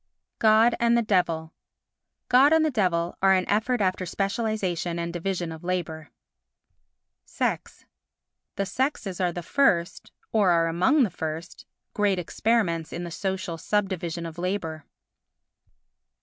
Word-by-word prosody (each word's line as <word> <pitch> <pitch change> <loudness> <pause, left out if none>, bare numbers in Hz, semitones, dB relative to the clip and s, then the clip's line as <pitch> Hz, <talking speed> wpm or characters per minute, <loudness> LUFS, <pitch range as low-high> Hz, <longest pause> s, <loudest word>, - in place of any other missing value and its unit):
God 220 +2 +5
and 235 0 +3
the 235 - +2
Devil 170 -6 0 0.7
God 270 +5 +5
and 320 0 +4
the 310 - +1
Devil 175 -7 0
are 195 0 +5
an 185 -1 +1
effort 220 +3 +1
after 185 -1 0
specialisation 195 -3 -2
and 170 0 -3
division 175 -1 -3
of 160 0 -9
labour. 160 -4 -3 1.1
Sex - - -3 0.7
The 195 - -1
sexes 200 -4 -2
are 180 -1 +1
the 175 0 -6
first—or 195 -2 0
are 170 -1 +3
among 185 - +3
the 210 - 0
first 160 +2 -6 0.3
great 205 -2 +1
experiments 180 -2 0
in 175 - -5
the 170 - -6
social 190 -2 -3
subdivision 175 -4 -2
of 165 +1 -8
labour. 175 -5 -3
185 Hz, 130 wpm, -25 LUFS, 170-215 Hz, 1.1 s, God